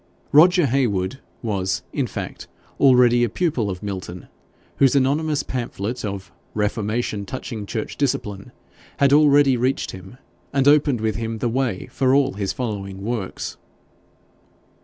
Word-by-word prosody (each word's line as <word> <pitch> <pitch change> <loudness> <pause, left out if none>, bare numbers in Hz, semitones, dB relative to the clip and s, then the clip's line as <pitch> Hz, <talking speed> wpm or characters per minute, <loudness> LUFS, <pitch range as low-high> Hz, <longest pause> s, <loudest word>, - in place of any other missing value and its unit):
Roger 175 +3 +6
Heywood 120 -4 0 0.2
was, 95 -4 -1
in - - 0
fact, - - -7 0.3
already 125 -3 +5
a 120 - +1
pupil 130 - -1
of 90 0 -5
Milton, 95 -3 -6 0.5
whose 135 0 +4
anonymous 145 +3 +1
pamphlet 120 -1 -4
of 100 -2 -5 0.2
'Reformation 105 0 -1
touching 110 -1 -6
Church 110 0 -4
Discipline' 105 -8 -2 0.5
had 140 0 +4
already 145 -2 +5
reached 130 +3 0
him, 95 +6 -11 0.4
and 135 0 +2
opened 145 -5 +4
with 110 -1 -1
him 115 0 -3
the 120 - -1
way 120 -6 -1
for 130 -1 +2
all 140 -1 +2
his 100 -1 -2
following 100 -5 -5
works. 110 -4 -4
120 Hz, 135 wpm, -22 LUFS, 100-135 Hz, 0.5 s, Roger